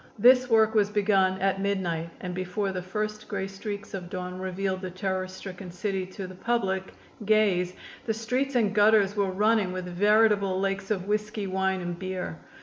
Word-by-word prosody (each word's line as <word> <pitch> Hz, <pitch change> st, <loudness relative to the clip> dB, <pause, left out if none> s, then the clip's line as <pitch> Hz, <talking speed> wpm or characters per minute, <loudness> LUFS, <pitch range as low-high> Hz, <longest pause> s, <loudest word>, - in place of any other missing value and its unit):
This 250 Hz, +3 st, +6 dB
work 220 Hz, -1 st, +4 dB
was 210 Hz, -2 st, +3 dB
begun 195 Hz, -2 st, +2 dB
at 195 Hz, 0 st, +1 dB
midnight 175 Hz, -5 st, -1 dB
and 180 Hz, -1 st, -4 dB
before 185 Hz, +2 st, -2 dB
the 185 Hz, -1 st, -3 dB
first 210 Hz, +3 st, -4 dB
gray 195 Hz, -2 st, -2 dB
streaks 200 Hz, +1 st, -6 dB
of 180 Hz, -3 st, -5 dB
dawn 180 Hz, -1 st, -5 dB
revealed 190 Hz, 0 st, -2 dB
the 185 Hz, -, -4 dB
terror 185 Hz, +1 st, -2 dB
stricken 185 Hz, 0 st, -8 dB
city 190 Hz, +1 st, -3 dB
to 190 Hz, +1 st, -7 dB
the 185 Hz, -, -9 dB
public 190 Hz, -2 st, -1 dB, 0.3 s
gaze 195 Hz, -4 st, +2 dB, 0.3 s
the 220 Hz, -, +2 dB
streets 250 Hz, +5 st, -1 dB
and 215 Hz, -4 st, +2 dB
gutters 205 Hz, -1 st, +4 dB
were 200 Hz, -2 st, +1 dB
running 210 Hz, 0 st, +2 dB
with 185 Hz, 0 st, -4 dB
veritable 200 Hz, +1 st, +3 dB
lakes 195 Hz, 0 st, -1 dB
of 195 Hz, -3 st, -1 dB
whisky, 210 Hz, 0 st, -1 dB
wine 190 Hz, 0 st, 0 dB
and 175 Hz, -1 st, -4 dB
beer. 185 Hz, -3 st, -4 dB
195 Hz, 175 wpm, -27 LUFS, 185-210 Hz, 0.3 s, This